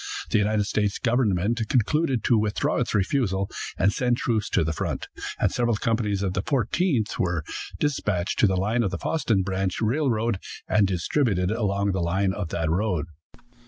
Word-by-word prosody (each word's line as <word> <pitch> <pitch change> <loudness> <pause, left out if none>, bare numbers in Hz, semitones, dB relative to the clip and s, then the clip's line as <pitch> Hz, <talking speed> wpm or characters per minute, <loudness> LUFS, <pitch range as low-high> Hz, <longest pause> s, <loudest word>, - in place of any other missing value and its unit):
The - - +4
United 105 0 +2
States 105 0 0
government 115 -2 +1
concluded 130 +1 +1
to 120 - +3
withdraw 110 +8 0
its 125 -3 -1
refusal, 100 -2 0 0.3
and 100 +2 +3
send 125 -1 +1
troops 110 -4 0
to - - +2
the 80 +1 -1
front, - - -3 0.3
and - - +2
several 120 -2 +1
companies 105 -2 0
of 95 -2 -1
the 90 - 0
Fourteenth 130 - 0
were 85 -3 0 0.4
dispatched 105 -11 -1
to 110 - +6
the 95 -1 +1
line 110 +6 +1
of 105 - +1
the 95 - -3
Fosston 115 - 0
branch 95 0 -1
railroad, 115 -3 +1 0.3
and 105 -2 +3
distributed 95 - 0
along 100 -3 0
the 95 -1 -1
line 95 +3 +1
of 100 -5 -4
that 80 -1 -1
road. 90 -4 0
105 Hz, 170 wpm, -25 LUFS, 95-120 Hz, 0.4 s, to